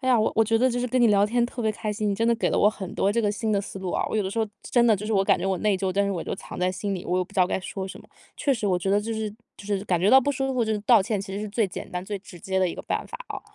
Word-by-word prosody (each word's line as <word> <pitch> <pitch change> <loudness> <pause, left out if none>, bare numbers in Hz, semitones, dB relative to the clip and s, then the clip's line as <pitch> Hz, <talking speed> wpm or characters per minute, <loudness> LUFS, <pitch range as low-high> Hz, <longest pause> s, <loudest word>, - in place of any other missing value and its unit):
哎 260 - -5
呀， 255 - +6 0.2
我 225 - +4
觉 225 +1 +2
得 255 +2 +4
就 245 - -2
是 250 - -1
跟 255 +1 +1
你 240 - +6
聊 205 -1 +4
天 235 +3 +1
特 240 -1 -6
别 220 -1 +1
开 215 +1 -4
心， 210 0 -2
你 - - 0
真 225 +3 +1
的 235 - +4
给 230 - 0
了 - - +1
我 210 - +6
很 195 -4 -6
多 200 - +2
这 230 +2 +1
个 205 0 +1
新 220 +1 -2
的 205 - +2
思 195 0 -6
路 190 -1 -4
啊。 - - 0
我 - - -3
有 215 - +2
的 190 - -3
时 230 - -4
候， 220 - +2 0.2
真 240 -1 +3
的， 220 - +5
就 210 +2 -5
是 220 - -1
我 195 -1 +3
感 - - +3
觉 - - -2
我 190 -1 +1
内 210 -2 +2
疚， 190 0 -1
但 200 +2 +1
是 200 - -1
我 175 - -3
就 - - -3
藏 - - -9
在 180 0 +2
心 195 +1 -3
里， 180 - -5
我 180 - 0
也 185 - +1
不 200 - -20
知 195 - +1
道 180 - +5
该 - - -1
说 190 +1 -5
什 - - -9
么。 - - -15 0.3
确 280 - +1
实 225 -5 -2
我 185 -2 +2
觉 190 +2 -2
得 205 +1 +3
就 225 +2 -3
是 220 -1 -3 0.3
就 - - -12
是 200 -1 -1
感 175 -2 +2
觉 190 +4 +3
到 265 +1 +8
不 285 - 0
舒 270 -1 -1
服， 250 -2 +1 0.2
道 225 0 +5
歉 210 0 -1
其 195 0 -6
实 200 - -3
是 215 - -4
最 215 +1 +1
简 180 - -8
单 180 0 -4
最 205 0 -4
直 185 -2 -13
接 190 +2 -2
的 185 -1 +2
一 - - -5
个 - - -7
办 - - -2
法 - - -7
啊。 - - -5
205 Hz, 415 characters per minute, -25 LUFS, 190-225 Hz, 0.3 s, 到